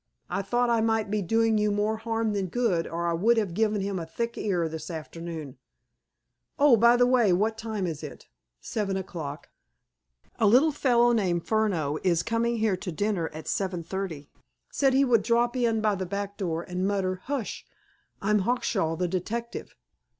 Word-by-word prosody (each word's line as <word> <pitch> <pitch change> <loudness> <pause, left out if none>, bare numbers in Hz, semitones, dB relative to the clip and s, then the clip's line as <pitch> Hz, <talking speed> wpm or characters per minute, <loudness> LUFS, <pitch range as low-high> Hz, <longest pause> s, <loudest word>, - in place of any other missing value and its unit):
I 185 +2 0
thought 240 +4 +1
I 230 -1 +3
might 220 -2 0
be 210 0 0
doing 225 +3 +2
you 210 0 +2
more 210 +2 0
harm 225 -1 -1
than 195 -2 -1
good, 190 -5 0
or 170 +1 -3
I 170 - +1
would 220 +8 +3
have 205 -6 0
given 215 +1 +1
him 195 -1 -2
a 165 - -5
thick 235 +8 -3
ear 175 -5 0
this 160 +2 -7
afternoon... 160 -4 -7 1.0
Oh, 285 -4 +6
by 235 +2 +5
the 245 - +5
way, 245 -5 +4
what 215 +5 +1
time 220 -3 -3
is 160 -4 -4
it?" - - -9 0.3
"Seven 195 - -2
o'clock." 160 -6 -6 0.9
"A 220 - +4
little 260 +9 +5
fellow 240 -4 +3
named 180 -7 0
Furneaux 180 -10 0
is 170 -3 +2
coming 230 +1 0
here 215 -4 +1
to 180 0 -5
dinner 195 -1 -1
at 155 +1 -9
seven 185 -3 -2
thirty. 165 -6 -5 0.4
Said 270 -2 +2
he 275 +1 +5
would 235 -4 +4
drop 240 +3 +1
in 230 -3 +1
by 215 -1 +2
the 190 -2 -3
back 200 +1 -4
door, 170 -5 -2
and 180 +1 -2
mutter 185 -2 -1
'Hush! 275 -6 -3 0.6
I'm 210 +1 +3
Hawkshaw, 195 -6 0
the 180 +2 -1
detective. 220 +7 -4
205 Hz, 180 wpm, -27 LUFS, 180-230 Hz, 1.0 s, Oh